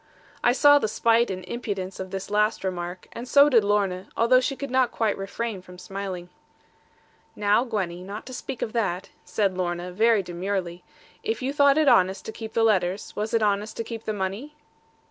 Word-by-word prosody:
I 240 - +5
saw 290 +3 +6
the 220 - 0
spite 230 +2 +2
and 185 -1 -5
impudence 195 -4 -5
of 190 0 -5
this 195 +1 -6
last 210 0 +1
remark, 180 -1 -4
and 240 - -7
so 285 +3 +6
did 235 -6 +5
Lorna, 200 -3 0
although 245 +3 +5
she 265 +2 -1
could 275 -1 -6
not 260 -2 +3
quite 220 -3 0
refrain 200 +1 -4
from 180 0 -14
smiling. 185 -1 -6 1.1
'Now, 210 +3 +3
Gwenny, 190 -7 -3
not 200 +4 -7
to 255 - -9
speak 255 0 -5
of 220 - -4
that,' 195 -6 -1
said 195 -3 0
Lorna, 175 0 -3
very 220 +2 +3
demurely, 180 0 -4 0.4
'if 445 - -3
you 270 +2 -1
thought 285 0 +5
it 310 -2 +3
honest 190 -6 +4
to - - -5
keep 220 0 -8
the 225 - +2
letters, 190 -3 +1
was 215 +1 -2
it 230 -2 +2
honest 210 +1 0
to 230 - -2
keep 225 -1 -7
the - - -1
money?' 210 +9 -4
210 Hz, 195 wpm, -25 LUFS, 185-235 Hz, 1.1 s, saw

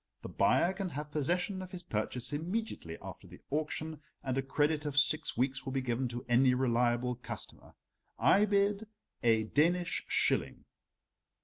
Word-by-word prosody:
The - - -6
buyer 175 +2 +3
can 190 -1 -3
have 150 0 -6
possession 175 +6 -1
of 185 - -7
his 180 -1 -8
purchase 120 0 -2
immediately 165 - -3
after - - -9
the - - -13
auction, 155 +1 -2 0.2
and 130 -2 -1
a 135 - +1
credit 145 +3 +1
of 145 -2 -3
six 145 -1 +2
weeks 130 +2 0
will 135 - -5
be 135 - 0
given 125 +1 -1
to 120 0 -6
any 125 +1 +4
reliable 125 -1 +1
customer. 125 - -8 0.4
I 205 +2 +5
bid 205 +1 +1 0.3
a 115 -2 +4
Danish 170 +9 +1
shilling." - - +1
145 Hz, 155 wpm, -32 LUFS, 125-175 Hz, 0.4 s, I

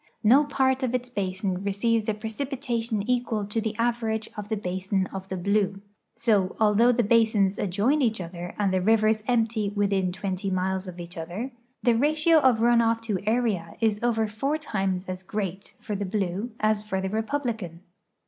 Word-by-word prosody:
No 260 +7 +6
part 265 -2 +1
of 255 -1 0
its 250 0 -3
basin 190 -2 -2
receives 220 +3 +1
a 215 - 0
precipitation 230 -1 -3
equal 240 -4 0
to 210 +3 -2
the 220 -1 -3
average 230 -2 0
of 210 -1 -7
the 220 - 0
basin 190 0 -1
of 190 0 -6
the 190 - -4
Blue; 200 +1 +1 0.4
so, 215 -5 +1
although 220 +3 +5
the 240 0 +2
basins 215 -3 +3
adjoin 210 +10 +1
each 225 -5 +1
other 175 0 -7
and 200 -2 +1
the 185 - +2
rivers 215 +1 +3
empty 225 -4 +1
within 200 -2 0
twenty 190 +1 -3
miles 190 0 -1
of 180 -1 -8
each 175 0 -8
other, 185 +11 -5 0.3
the 240 - +4
ratio 310 +5 +4
of 255 -6 +3
run 235 0 +5
off 230 0 +2
to 215 -4 -2
area 215 -8 0
is 220 -2 +1
over 230 -2 +1
four 245 +8 -1
times 195 -10 -2
as 185 0 -5
great 195 -1 -5
for 210 - -4
the 200 - -2
Blue 195 +2 -2
as 215 -1 +2
for 195 -3 -2
the 190 - -2
Republican. 220 - -3
215 Hz, 180 wpm, -26 LUFS, 190-235 Hz, 0.4 s, No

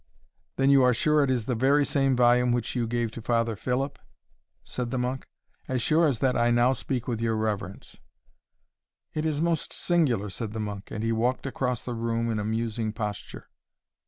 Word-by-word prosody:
"Then 135 +1 +3
you 140 -1 +6
are 125 -1 +4
sure 150 +4 +3
it 140 - 0
is 125 -4 0
the 125 - -1
very 140 +5 +3
same 135 -2 +2
volume 125 0 +4
which 120 0 -1
you 120 -2 0
gave 120 -1 -1
to 115 - -8
Father 115 0 0
Philip?" 130 +6 -2 0.6
said 125 -2 -4
the 130 - -2
monk. 125 +1 -2 0.4
"As 130 -1 -1
sure 155 +7 +3
as 135 -5 0
that 130 - +2
I 120 0 +3
now 120 +2 +4
speak 130 -2 -3
with 115 -3 -2
your 115 -1 +1
reverence." 105 -3 -4 1.1
"It 155 +1 -1
is 155 0 0
most 170 -2 0
singular!" 130 - +1
said 110 +2 -5
the 110 - -4
monk; 105 -2 -5
and 110 - -5
he 115 - +1
walked 120 +4 0
across 125 -3 -2
the 125 - -4
room 115 0 -1
in 110 - -1
a - - -2
musing 110 0 -2
posture. 105 -2 -6
120 Hz, 195 wpm, -27 LUFS, 115-130 Hz, 1.1 s, you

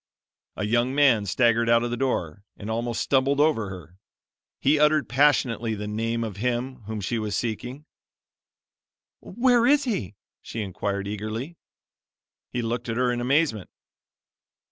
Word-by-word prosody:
A 105 - -2
young 120 +4 +1
man 125 -8 +4
staggered 115 +3 +2
out 115 0 +4
of 120 - -2
the - - -1
door, 100 - -2
and 105 +2 -6
almost 115 +1 -2
stumbled 140 +1 +2
over 145 -9 +2
her. 90 -1 -11 0.6
He 145 +2 +3
uttered 150 0 +3
passionately 120 -4 +2
the 105 0 -5
name 115 +2 -2
of 105 -4 -5
Him 125 +3 -2
whom 110 -1 -4
she 115 +4 -2
was 105 -2 -3
seeking. 125 +5 -4 1.3
"Where 240 +2 +2
is 290 +1 +4
He?" 120 - -3 0.3
she 115 - -5
inquired 100 +1 -3
eagerly. 110 +9 -5 0.9
He 120 - -3
looked 120 +1 -3
at 115 - -2
her 125 0 +2
in 120 0 -2
amazement. 130 - +1
120 Hz, 145 wpm, -25 LUFS, 105-135 Hz, 1.3 s, man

